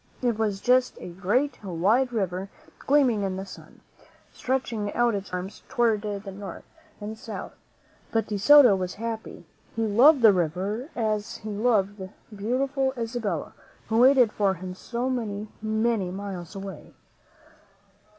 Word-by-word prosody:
It 240 -2 +2
was 205 -3 -1
just 255 0 +3
a - - -8
great, 215 +10 -1
wide 205 +8 +1
river, 190 -3 -2 0.3
gleaming 270 -7 +3
in 195 -1 -2
the 190 +1 -5
sun, 190 - -13 0.5
stretching 235 -5 -2
out 240 -1 +3
its 200 -1 -4
wide - - -2
arms 190 +3 -7
toward 225 -3 +2
the 205 -1 -5
north 195 +1 -8 0.4
and 210 0 -5
the - - -7
south. 225 -4 -7 0.6
But 225 -1 +1
De 205 -2 -3
Soto 270 -1 +8
was 185 -1 -3
happy. 225 0 -6 0.3
He 225 0 0
loved 250 +6 +5
the 215 -3 +8
river 190 - -2
as 215 -2 -2
he 215 - -8
loved 205 -2 +1
the 190 0 -7 0.3
beautiful 265 +5 -1
Isabella, 225 -7 -3 0.4
who 225 0 +2
waited 255 -3 +6
for 200 -3 +1
him 185 +1 -7
so 235 +6 -4
many, 215 -5 -3
many 220 -2 0
miles 190 -1 -6
away. 195 0 -8
215 Hz, 150 wpm, -26 LUFS, 195-240 Hz, 0.6 s, Soto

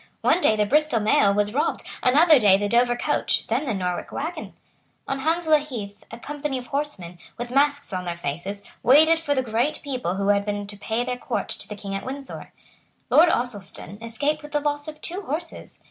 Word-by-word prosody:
One 360 - +3
day 215 - +4
the 210 -1 +2
Bristol 300 +1 +2
mail 210 -1 +4
was 205 +1 0
robbed; 290 - 0 0.2
another 300 +4 +6
day 200 -4 +6
the 205 +1 -1
Dover 240 +2 +3
coach; - - 0
then 255 +6 -1
the 235 - 0
Norwich 180 -2 -3
waggon. 315 +3 -5 0.5
On 275 - -2
Hounslow 320 +2 +3
Heath 220 -9 -7
a 230 - -8
company 290 +1 -4
of 250 - -7
horsemen, 245 - -4 0.2
with 240 0 -5
masks 285 -2 +2
on 180 0 -3
their 170 -1 -4
faces, 175 +7 -5 0.2
waited 315 +6 +6
for 290 -3 -1
the 260 - +1
great 240 +5 0
people 250 -10 -2
who 200 +1 0
had 200 0 +3
been 205 0 -3
to 205 0 -8
pay 220 +4 -2
their 250 0 -3
court - - -3
to - - -6
the 210 - -6
King 200 -1 -7
at 195 - -3
Windsor. 270 +1 -7 0.6
Lord 335 +3 +7
Ossulston 205 - -3
escaped 230 +7 -1
with 295 0 -11
the 295 - +2
loss 290 0 -2
of 305 0 -8
two 360 +4 -5
horses. 330 0 -6
250 Hz, 205 wpm, -24 LUFS, 205-295 Hz, 0.6 s, Lord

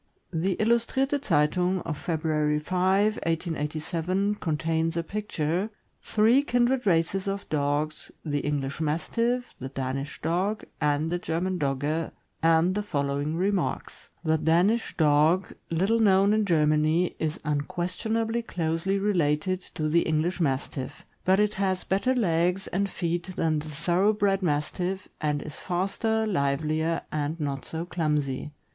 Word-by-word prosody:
The 175 +3 0
niustrirte 250 +5 +1
Zeitung 180 - +2
of 160 - -2
February 155 -1 0
5, 190 +6 +2
1887, 165 +4 -1
contains 165 -2 -1
a 170 - 0
picture, 185 -1 -2 0.3
"Three 225 +5 +4
Kindred 245 -3 +1
Races 185 +2 +2
of 200 +1 -3
Dogs, 150 +1 -1 0.2
the 145 -2 0
English 140 0 -2
Mas 155 +1 -1
tiff, 245 +1 0
the 130 - -5
Danish 135 +1 -4
Dog, 185 +7 0 0.2
and 150 +2 +1
the 175 - 0
German 180 +2 -2
Dogge," 145 +3 -1 0.3
and 165 +2 +4
the 210 - -1
following 145 -4 -1
remarks: 190 +1 -2
The 160 -1 +2
Danish 180 +10 +2
Dog, 155 +4 +3 0.2
little 195 +8 +2
known 200 -1 +5
in 215 -1 +2
Germany, 155 0 +2
is 155 0 -2
unquestionably 180 +10 -1
closely 170 -1 -1
related 185 -2 +1
to 155 - -1
the 170 +2 +3
English 160 +4 0
Mastiff, 135 -2 -2 0.2
but 190 +1 +5
has 195 -3 +1
better 225 +7 +1
legs 180 -3 +1
and 200 +2 -1
feet 175 +1 -3
than 155 -2 +1
the 155 +1 -7
thorough 175 +7 +2
bred 200 -2 +1
Mastiff, 180 +4 -1
and 150 -1 0
is 155 - -8
faster, 200 +5 0
livelier, 155 -2 0
and 155 +2 -2
not 140 -3 -3
so 165 +1 -4
clumsy. 150 -6 -1
170 Hz, 135 wpm, -27 LUFS, 150-195 Hz, 0.3 s, known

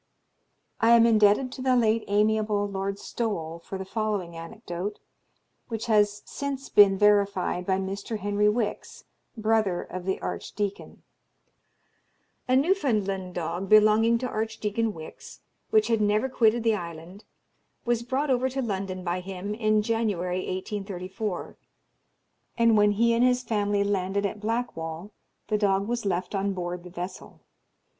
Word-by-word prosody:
I 230 +1 +6
am 230 0 +6
indebted 220 +3 +4
to 260 - -8
the 255 -1 +3
late 225 -2 +2
amiable 210 0 +1
Lord 195 0 -3
Stowell 170 -8 -4
for 190 +3 -7
the 190 - -6
following 205 -4 -2
anecdote, 180 +2 -6 0.7
which 225 -1 -4
has 210 -2 +2
since 275 -1 -5
been 200 -2 +6
verified 200 -3 +2
by 190 -1 +2
Mr. 195 +3 -4
Henry 205 +1 +1
Wix, 210 -1 -3 0.3
brother 215 -4 +1
of 185 -1 -7
the 190 - -1
archdeacon: 205 -1 -5 1.4
A 255 - +3
Newfoundland 215 - +1
dog 175 +3 -3
belonging 215 +2 +5
to 255 +2 -3
Archdeacon 220 0 -2
Wix, 160 -5 -11 0.3
which 435 -1 +4
had 225 -2 +1
never 210 +4 +2
quitted 235 -2 +2
the 225 -1 +3
island, 170 +1 -7 0.6
was 240 -1 +1
brought 265 +4 -1
over 255 +1 +2
to 265 +1 -4
London 190 -4 -3
by 175 0 -1
him 190 +2 -5
in 215 -1 +2
January 205 -6 -1
1834, 190 0 -5 1.0
and 230 -1 +4
when 210 0 +4
he 230 +3 +3
and 230 +1 +3
his 250 0 +3
family 205 -3 0
landed 200 0 -1
at 205 +1 -3
Blackwall 205 -6 -3 0.4
the 210 - +1
dog 200 -1 +1
was 235 -2 -2
left 180 0 -2
on 200 0 0
board 175 -1 -4
the 180 - -10
vessel. 180 +1 -8
210 Hz, 140 wpm, -26 LUFS, 190-225 Hz, 1.4 s, I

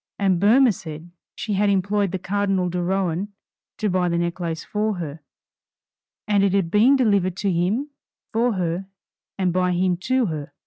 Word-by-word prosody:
And 190 -3 +2
Boehmer 235 +6 +5
said, 170 -3 -9 0.2
she 210 - -3
had 205 +1 +2
employed 200 0 +1
the 190 - -2
Cardinal 195 -1 0
de 175 0 -2
Rohan 190 +1 -1 0.5
to 215 - -1
buy 180 -2 +1
the 170 - 0
necklace 170 -1 -2
for 210 0 -1
her, 160 -3 -6 1.1
and 205 -2 +3
it 195 -1 +2
had 190 -4 +1
been 230 +8 +5
delivered 200 -8 +2
to 195 -1 0
him 200 - 0 0.4
for 235 +1 +2
her, 180 0 -2 0.5
and 185 -3 0
by 180 0 +1
him 180 0 +1
to 255 +7 +1
her. 150 -5 -5
190 Hz, 170 wpm, -23 LUFS, 175-205 Hz, 1.1 s, Boehmer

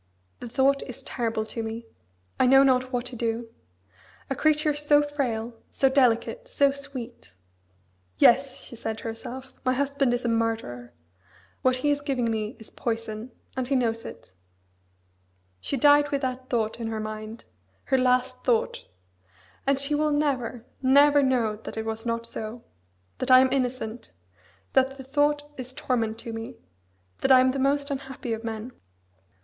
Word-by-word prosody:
The 240 - -7
thought 275 +3 +3
is 250 - -9
terrible 225 -3 -2
to 225 +1 -5
me. 225 +1 -5 0.5
I 255 - +5
know 270 +1 +7
not 255 -1 +2
what 245 -1 -1
to 250 - -7
do. 230 0 -2 0.8
A - - +1
creature 305 0 +2
so 295 0 +3
frail, 245 -6 -2 0.2
so 270 - +3
delicate, 265 - +2
so 285 - +3
sweet. 260 - -8 0.8
"Yes!" 270 +2 +5
she 240 - -10
said 225 -1 -4
to - - -10
herself, 240 +3 -7
"my 255 -1 +2
husband 280 -1 +1
is 245 - -4
a - - +2
murderer; 225 - -1 0.7
what 255 0 +3
he 290 +3 +1
is 290 0 0
giving 255 -5 0
me 220 +2 -2
is 220 - -13
poison, 225 0 -4 0.2
and 260 -1 -2
he 275 - +1
knows 230 -3 0
it." 95 - -10 1.3
She 275 - -2
died 290 +2 +5
with 280 -1 -1
that 255 0 -3
thought 225 -2 -1
in 230 - -3
her 220 -1 -3
mind 215 +1 -6 0.4
her 265 - +2
last 250 0 +1
thought. 235 -3 0 0.8
And 275 0 +4
she 280 +2 -1
will 305 +1 +2
never, 260 -5 -1 0.2
never 285 +2 +6
know 240 -6 +1
that 220 - -9
it 220 - -2
was 225 +1 -4
not 230 0 -1
so; 230 0 -6 0.6
that 255 - -2
I 255 0 +9
am 260 0 +4
innocent; 245 - -3 0.6
that 265 +1 +3
the 265 - -8
thought 290 +2 +1
is 255 0 -8
torment 225 -3 -1
to 230 - -6
me: 225 0 -6 0.6
that 270 - +2
I 260 - +9
am 255 0 +4
the 270 - -3
most 280 +2 +1
unhappy 265 -3 -4
of 225 +1 -5
men. 225 +2 -5
255 Hz, 165 wpm, -26 LUFS, 225-275 Hz, 1.3 s, I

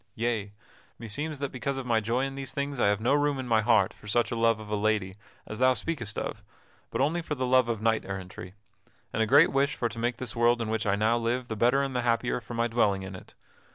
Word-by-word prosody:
Yea; 110 -3 -1 0.5
meseems 145 +8 -3
that 140 0 -4
because 135 +1 -3
of 135 - -4
my 115 -2 +2
joy 115 +5 0
in 135 - -5
these 135 -1 -4
things 140 -1 -3
I - - +3
have 100 0 +2
no 120 +5 +2
room 145 -1 +2
in 130 -1 -5
my 110 -2 +3
heart 110 -4 +3
for 105 - -16
such 120 +3 +1
a - - -1
love 115 -1 +2
of 110 - -9
lady 105 -2 0 0.3
as 110 - -7
thou 130 0 +4
speakest 120 -11 -3
of, 105 - -4 0.5
but - - -2
only 160 +5 +1
for 155 -2 -4
the 130 -2 -2
love 125 -1 +3
of 110 -2 -2
knight 110 -1 +2
errantry, 95 -1 -7 0.6
and 115 - 0
a 110 - +2
great 145 +7 +6
wish 140 +1 +1
for 120 - -1
to 115 - -8
make 120 +1 -1
this 125 -3 -5
world 120 +1 +3
in 115 -2 -3
which 110 -1 -1
I 100 - +3
now 110 +3 +2
live 120 +2 -2
the 110 - -3
better 120 +6 +3
and 135 -2 -3
the 125 - +1
happier 120 +1 0
for 120 +1 -8
my 115 0 +1
dwelling 105 -5 +1
in 95 0 -7
it. - - -13
120 Hz, 260 wpm, -28 LUFS, 110-130 Hz, 0.6 s, great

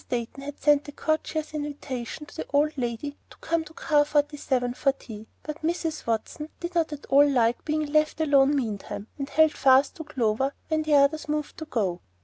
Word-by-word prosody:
Dayton 245 +2 -3
had 285 +1 -7
sent 295 -1 +3
a - - -6
courteous 310 +1 -2
invitation 290 -2 -5
to - - -15
the - - -4
old 295 +2 +2
lady 255 +3 -3
to - - -16
come 330 -1 -1
to 305 - -13
Car 295 -2 +3
Forty 295 0 +1
seven 250 -4 -1
for 275 +2 +1
tea, 220 -4 -11 0.2
but 305 +1 -6
Mrs. 320 -2 -2
Watson 230 +7 -2
did 345 +1 -5
not 330 -2 +1
at 290 -2 -7
all 285 +1 +5
like 240 -3 +2
being 310 0 0
left 305 +1 +1
alone 285 -2 +4
meantime, 215 -4 -4
and 275 0 -3
held 315 -1 +5
fast 270 +1 +4
to 320 - -5
Clover 265 -2 0
when 315 -1 +1
the 305 -1 +2
others 290 +2 +3
moved 300 0 -2
to 315 - -5
go. 195 - -1
290 Hz, 200 wpm, -26 LUFS, 260-310 Hz, 0.2 s, all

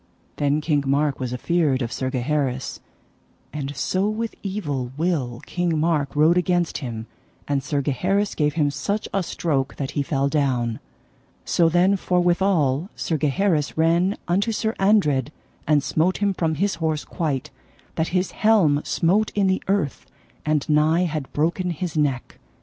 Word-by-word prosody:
Then 145 +1 +1
King 150 -2 +1
Mark 140 +1 +1
was 125 -2 -3
afeard 140 0 +1
of 115 - -4
Sir 130 - -2
Gaheris, 130 0 -2 0.7
and 145 -1 -4
so 185 +10 0
with 225 +1 -3
evil 145 -11 -3
will 145 -8 -1
King 175 -2 -1
Mark 150 -4 0
rode 160 +4 +5
against 175 -1 0
him, 115 -5 -5 0.4
and 140 -1 0
Sir 145 0 -1
Gaheris 190 +9 0
gave 150 -1 0
him 150 -3 +2
such 205 +8 -2
a 195 - +1
stroke 145 -6 -1
that 140 -1 -4
he 145 - -1
fell 140 0 0
down. 130 -6 0 0.7
So 170 -1 +3
then 180 +4 +3
forthwithal 175 -4 +1
Sir 165 - -2
Gaheris 155 0 +1
ran 170 +5 +2
unto 200 +6 +1
Sir 220 0 -1
Andred 150 - +3 0.4
and 150 -2 +3
smote 160 +6 +1
him 200 -1 +1
from 165 -3 0
his 200 +5 0
horse 155 -2 -1
quite, 145 -6 -3 0.4
that 160 - -1
his 180 0 0
helm 190 -10 +3
smote 200 +6 +1
in 205 -1 +2
the 190 0 +1
earth, 190 -9 -1 0.4
and 150 -2 0
nigh 155 +3 +3
had 155 -5 -3
broken 170 +4 0
his 170 0 -4
neck. 140 -5 -1
155 Hz, 155 wpm, -23 LUFS, 140-180 Hz, 0.7 s, rode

